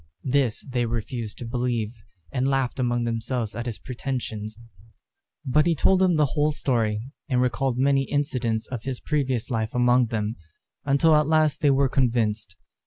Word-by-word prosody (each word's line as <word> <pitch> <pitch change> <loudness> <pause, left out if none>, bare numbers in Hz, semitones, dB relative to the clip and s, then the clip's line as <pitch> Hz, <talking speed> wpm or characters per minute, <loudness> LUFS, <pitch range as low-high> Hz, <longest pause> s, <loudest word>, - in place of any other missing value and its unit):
This 130 -4 +1
they 125 -2 -1
refused 115 -1 -4
to 120 - -6
believe, 120 -2 -1 0.4
and 130 +1 0
laughed 135 -1 0
among 120 -1 +1
themselves 115 -1 -2
at 120 +1 -4
his 115 - -4
pretensions; 115 -5 -5 0.9
but 150 +4 +3
he 170 - +3
told 185 +6 +3
them 185 -2 +3
the 150 -1 +4
whole 150 0 +2
story, 115 -7 0 0.3
and 125 -2 +2
recalled 125 0 0
many 135 +1 +3
incidents 125 -7 -1
of 125 -2 -5
his 130 +1 -4
previous 135 -6 -1
life 110 0 -2
among 125 0 +4
them, 110 0 -2 0.5
until 145 +3 +4
at 150 -1 +3
last 155 -2 +2
they 145 - +4
were 135 0 +3
convinced. 115 -7 0
125 Hz, 165 wpm, -25 LUFS, 115-140 Hz, 0.9 s, the